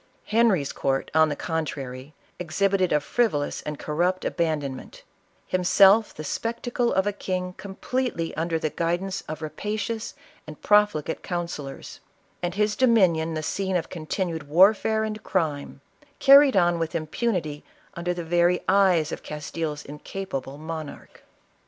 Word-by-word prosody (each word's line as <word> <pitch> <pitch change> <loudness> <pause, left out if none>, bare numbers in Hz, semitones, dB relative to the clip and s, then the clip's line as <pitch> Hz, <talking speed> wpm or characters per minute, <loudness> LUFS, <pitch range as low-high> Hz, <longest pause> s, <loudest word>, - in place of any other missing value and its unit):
Henry's 210 -10 +2
court, 135 0 -1
on 160 0 +5
the 145 - -2
contrary, 145 -4 -5 0.2
exhibited 185 +2 +1
a 150 - +4
frivolous 150 -3 0
and 150 -1 -5
corrupt 175 +6 -1
abandonment; 150 -6 -3 0.4
himself 195 +4 +4
the 155 - -8
spec 230 +9 -3
tacle 245 -1 0
of 190 +1 +2
a 205 - 0
king 180 -2 -3
completely 195 -1 -3
under 165 +1 -1
the 155 -1 -2
guidance 175 +3 -2
of 155 +1 -5
rapa 160 +8 -4
cious 225 +1 -4 0.3
and 155 -1 -10
profligate 205 -7 +2
councillors; 170 -6 -5 0.4
and 175 0 -2
his 210 0 +1
dominion 180 -10 +3
the 155 - -3
scene 190 +4 -2
of 170 - -4
continued 165 -2 -4
warfare 210 +7 +4
and 215 0 -4
crime, 150 -7 -2 0.4
carried 275 -4 +7
on 175 -2 +3
with 165 0 -3
impunity 160 -2 -2 0.3
under 170 +1 -2
the 175 - -4
very 175 +2 +2
eyes 180 -6 +3
of - - -5
Castile's 150 0 -5
incapable 145 -2 -6
monarch. 155 -1 -8
175 Hz, 140 wpm, -25 LUFS, 155-195 Hz, 0.4 s, carried